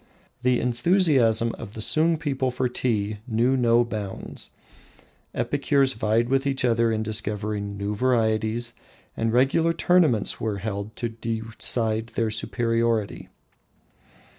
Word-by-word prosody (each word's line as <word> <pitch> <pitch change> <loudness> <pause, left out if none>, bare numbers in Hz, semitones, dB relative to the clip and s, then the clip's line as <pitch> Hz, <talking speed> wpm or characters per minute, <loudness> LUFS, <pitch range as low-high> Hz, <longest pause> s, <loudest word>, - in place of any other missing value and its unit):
The 125 0 +2
enthusiasm 125 - +2
of 110 -2 -9
the - - -7
Sung 160 +9 +2
people 135 -4 -1
for 125 +1 -1
tea 110 -4 -1
knew 120 +3 +2
no 120 -1 +3
bounds. 105 -4 -6 0.9
Epicures 140 -1 +1
vied 110 +2 +1
with 135 +2 +1
each 135 -2 0
other 115 -1 +2
in 110 0 -1
discovering 105 -1 -3
new 100 +1 -3
varieties, 115 0 0 0.4
and 115 0 -1
regular 135 +7 +2
tournaments 160 - +2
were 110 -2 -2
held 100 +1 -5
to 120 - -3
decide 115 0 0
their 115 -2 0
superiority. 115 -1 -1
115 Hz, 120 wpm, -24 LUFS, 110-130 Hz, 0.9 s, no